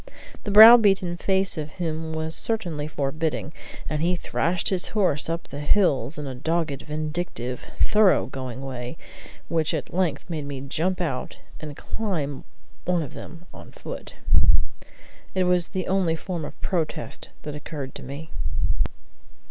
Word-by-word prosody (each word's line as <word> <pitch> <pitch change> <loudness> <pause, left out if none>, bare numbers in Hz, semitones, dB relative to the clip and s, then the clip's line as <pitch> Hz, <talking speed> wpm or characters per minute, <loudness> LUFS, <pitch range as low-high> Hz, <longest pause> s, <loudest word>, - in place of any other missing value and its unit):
The - - -2
brow 220 +4 +11
beaten 195 -5 +3
face 190 -1 +1
of 150 0 -5
him 160 -2 -3
was 160 0 -1
certainly 175 -10 0
forbidding, 155 +2 -2 0.3
and 155 -1 -1
he 175 +2 +2
thrashed 175 0 0
his 185 -1 +1
horse 170 -7 +2
up 165 +1 -3
the 140 - -6
hills 150 -2 +2
in 150 - -4
a 135 - -4
dogged, 155 +1 -1
vindictive, 150 -5 -3 0.2
thorough 210 -3 +4
going 130 -1 -6
way 125 +1 -5 0.5
which 160 0 +1
at 145 - -5
length 170 -6 0
made 160 -4 -4
me 140 -2 -4
jump 170 +7 -1
out 135 -7 -3 0.2
and 150 -2 -7
climb 160 -11 -3 0.4
one 175 -2 +2
of 140 - -8
them 170 0 -10
on - - -11
foot. - - -8 1.2
It 185 - +3
was 180 -1 +3
the 185 -2 -3
only 185 -4 +2
form 165 -1 -4
of - - -9
protest 170 -5 -2
that 150 - -5
occurred 145 -2 -6
to - - -8
me. 140 +4 -8
160 Hz, 150 wpm, -25 LUFS, 145-180 Hz, 1.2 s, brow